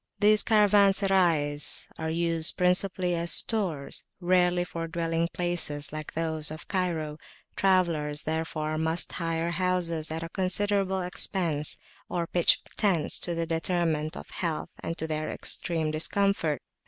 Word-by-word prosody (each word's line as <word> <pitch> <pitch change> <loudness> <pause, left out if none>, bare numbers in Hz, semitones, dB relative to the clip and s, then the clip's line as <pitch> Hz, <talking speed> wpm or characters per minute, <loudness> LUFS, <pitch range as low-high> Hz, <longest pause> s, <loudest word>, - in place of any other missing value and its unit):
These 210 +1 +6
Caravanserais 195 -8 +3
are 160 0 -2
used 165 +1 +1
principally 180 0 +2
as 170 0 0
stores, 180 -11 +1 0.2
rarely 180 0 +2
for 165 -2 -5
dwelling 165 0 -1
places 165 -5 -2
like 155 -1 -6
those 160 -2 0
of 155 +2 -8
Cairo; 165 -5 -2 0.4
travellers, 170 -6 +1
therefore, 155 -1 -2
must 160 +2 0
hire 165 0 -2
houses 170 -3 -1
at 160 +1 -4
a 165 - -6
considerable 190 0 0
expense, 170 -4 -1 0.3
or 170 -1 -1
pitch 175 0 +3
tents 180 -7 +1
to 175 - -1
the 165 0 -1
detriment 165 -1 -1
of - - -9
health 165 -4 -3
and 165 - -5
to 160 - -3
their 155 -1 -3
extreme 160 -3 -1
discomfort. 165 -2 +1
170 Hz, 130 wpm, -27 LUFS, 160-185 Hz, 0.4 s, These